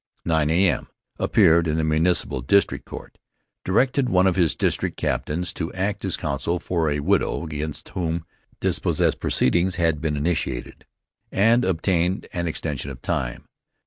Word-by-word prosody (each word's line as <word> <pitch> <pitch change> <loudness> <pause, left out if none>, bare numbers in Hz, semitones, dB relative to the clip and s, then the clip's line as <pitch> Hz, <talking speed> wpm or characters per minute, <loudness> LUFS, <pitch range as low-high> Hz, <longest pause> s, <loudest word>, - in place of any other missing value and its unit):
9 80 -2 +2
A.M.: 85 -1 +2 0.3
Appeared 85 +1 +4
in 75 - 0
the 80 - +1
Municipal 80 -3 +1
District 100 +11 +2
Court. - - -10 0.4
Directed 125 +6 +2
one 95 -3 +4
of 95 - +3
his 85 -4 +2
district - - -1
captains 85 +3 -2
to 85 -1 -4
act 100 +2 -2
as 95 -3 0
counsel 75 +4 -2
for 85 -2 -1
a 75 0 -1
widow 95 +2 +1
against 75 -1 -5
whom 85 -2 -3 0.3
dispossess - - +1
proceedings 85 +7 +1
had 80 -4 +1
been 75 -2 -1
instituted 70 -5 -3 0.4
and 115 +5 +4
obtained 90 0 0
an 85 -1 -2
extension 75 -4 -3
of 65 -2 -10
time. - - -2
85 Hz, 145 wpm, -23 LUFS, 75-95 Hz, 0.4 s, Appeared